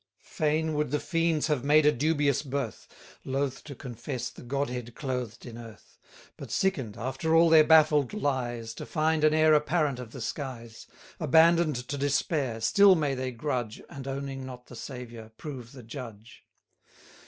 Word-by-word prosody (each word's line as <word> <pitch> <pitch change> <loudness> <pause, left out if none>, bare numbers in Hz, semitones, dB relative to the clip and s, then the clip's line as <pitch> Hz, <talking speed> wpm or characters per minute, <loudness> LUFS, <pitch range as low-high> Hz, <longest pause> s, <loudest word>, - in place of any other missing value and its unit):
Fain 155 +1 0
would 150 -2 0
the 150 +2 0
fiends 165 -3 0
have 150 -5 0
made 150 +1 +5
a 150 - +6
dubious 145 0 +1
birth, 135 -6 -4 0.4
Loath 135 0 -2
to 140 - -8
confess 125 0 -6
the - - -13
Godhead 125 -2 -3
clothed 125 -5 -4
in 120 -1 -9
earth: 115 -2 -13 0.4
But - - -9
sicken'd, 135 - -1
after 135 +7 -1
all 165 0 +6
their 160 -1 +8
baffled 155 -3 +5
lies, 120 - -2
To - - -8
find 155 -1 +1
an 155 0 +5
heir 155 0 +5
apparent 150 -3 +1
of 120 -3 -8
the 130 - -9
skies: 115 -3 -6 0.3
Abandon'd 160 0 +4
to 145 - -4
despair, 140 -3 0
still 195 - +6
may 150 -4 0
they 130 0 -3
grudge, 120 -3 -3
And, 135 -1 -8
owning 135 0 -4
not 125 -1 -9
the 125 - -12
Saviour, 120 -2 -8
prove 130 -6 -8
the 130 -3 -12
judge. 115 -2 -10
140 Hz, 165 wpm, -28 LUFS, 125-155 Hz, 0.4 s, their